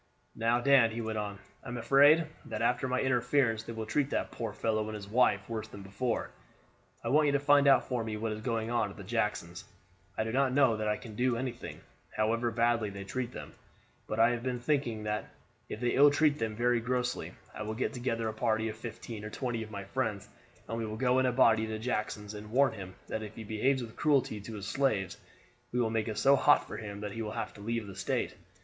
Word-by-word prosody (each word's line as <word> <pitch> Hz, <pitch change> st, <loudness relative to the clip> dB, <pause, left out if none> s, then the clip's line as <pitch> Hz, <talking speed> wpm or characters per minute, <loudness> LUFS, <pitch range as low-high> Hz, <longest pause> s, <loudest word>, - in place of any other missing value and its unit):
"Now, 115 Hz, +1 st, +2 dB
Dan," 130 Hz, -3 st, +5 dB
he 110 Hz, +1 st, -5 dB
went 110 Hz, -1 st, -2 dB
on, 100 Hz, -1 st, -4 dB, 0.3 s
"I -, -, -11 dB
am 120 Hz, 0 st, -4 dB
afraid 145 Hz, +7 st, +6 dB, 0.2 s
that 110 Hz, 0 st, -3 dB
after 125 Hz, +2 st, +1 dB
my 130 Hz, 0 st, 0 dB
interference 125 Hz, -2 st, +2 dB
they 115 Hz, +1 st, -7 dB
will 110 Hz, -1 st, -4 dB
treat 140 Hz, +5 st, 0 dB
that -, -, -2 dB
poor 115 Hz, -3 st, -4 dB
fellow 110 Hz, +1 st, -1 dB
and 110 Hz, -, -5 dB
his 100 Hz, -2 st, -7 dB
wife 100 Hz, -3 st, +2 dB
worse 110 Hz, -2 st, -4 dB
than 100 Hz, -, -10 dB
before. 110 Hz, +5 st, -2 dB, 0.7 s
I -, -, -2 dB
want 150 Hz, +1 st, +4 dB
you 140 Hz, -, +2 dB
to 145 Hz, -, +3 dB
find 145 Hz, 0 st, +5 dB
out 140 Hz, -, +5 dB
for 125 Hz, -3 st, -1 dB
me 110 Hz, -1 st, -4 dB
what 110 Hz, +1 st, -2 dB
is 110 Hz, 0 st, -5 dB
going 115 Hz, -1 st, -2 dB
on 115 Hz, -3 st, +1 dB
at 100 Hz, -1 st, -10 dB
Jackson's. 100 Hz, -5 st, -2 dB, 0.5 s
I -, -, +1 dB
do 110 Hz, -, -3 dB
not 130 Hz, +1 st, +2 dB
know 130 Hz, -5 st, +4 dB
that 110 Hz, 0 st, -2 dB
I 105 Hz, -, +1 dB
can 115 Hz, -3 st, -10 dB
do 125 Hz, +1 st, +1 dB
anything, 120 Hz, -1 st, -5 dB, 0.4 s
however 115 Hz, +2 st, +1 dB
badly 115 Hz, -1 st, +1 dB
they 100 Hz, 0 st, -7 dB
treat 120 Hz, +5 st, -3 dB
them; -, -, -9 dB, 0.5 s
but 110 Hz, -, -3 dB
I 115 Hz, +1 st, +6 dB
have 120 Hz, -1 st, -2 dB
been 125 Hz, 0 st, -2 dB
thinking 120 Hz, -5 st, 0 dB
that 105 Hz, 0 st, -2 dB, 0.4 s
if -, -, -5 dB
they 120 Hz, 0 st, +1 dB
ill 145 Hz, +2 st, +7 dB
treat 150 Hz, 0 st, +2 dB
them 110 Hz, -1 st, -2 dB
very 120 Hz, +1 st, +2 dB
grossly, 125 Hz, +1 st, -2 dB, 0.2 s
I -, -, -7 dB
will 110 Hz, +1 st, -3 dB
get 125 Hz, -, -1 dB
together 115 Hz, -2 st, -2 dB
a 110 Hz, -, -2 dB
party 110 Hz, 0 st, 0 dB
of 110 Hz, -, -7 dB
fifteen 110 Hz, -1 st, -7 dB
or 105 Hz, -, -5 dB
twenty 120 Hz, 0 st, -3 dB
of 110 Hz, -, -6 dB
my 100 Hz, -2 st, -6 dB
friends 95 Hz, -, -2 dB, 0.4 s
and 115 Hz, -, -3 dB
we 115 Hz, -, -2 dB
will 110 Hz, 0 st, -5 dB
go 125 Hz, +1 st, +3 dB
in 130 Hz, -, +3 dB
a -, -, +2 dB
body 115 Hz, -3 st, +4 dB
to 110 Hz, 0 st, -3 dB
Jackson's, 105 Hz, -2 st, -3 dB
and 105 Hz, 0 st, -8 dB
warn 130 Hz, +2 st, +3 dB
him 95 Hz, -3 st, -8 dB
that 110 Hz, -, -3 dB
if 110 Hz, -1 st, -8 dB
he 115 Hz, -, -7 dB
behaves 125 Hz, +5 st, +1 dB
with 115 Hz, -1 st, -9 dB
cruelty 135 Hz, -8 st, +1 dB
to 110 Hz, +2 st, -8 dB
his 100 Hz, -2 st, -6 dB
slaves, 110 Hz, -9 st, 0 dB, 0.5 s
we 125 Hz, -, 0 dB
will 115 Hz, -2 st, +1 dB
make 110 Hz, -1 st, 0 dB
it 110 Hz, -, -3 dB
so 140 Hz, +1 st, +5 dB
hot 145 Hz, +2 st, +4 dB
for -, -, -6 dB
him 100 Hz, -2 st, -7 dB
that 105 Hz, -1 st, -4 dB
he 115 Hz, -, -5 dB
will 105 Hz, -1 st, -4 dB
have -, -, -4 dB
to 100 Hz, -, -13 dB
leave 115 Hz, +1 st, -2 dB
the 100 Hz, -, -8 dB
state. 95 Hz, -, -1 dB
115 Hz, 240 wpm, -31 LUFS, 110-125 Hz, 0.7 s, ill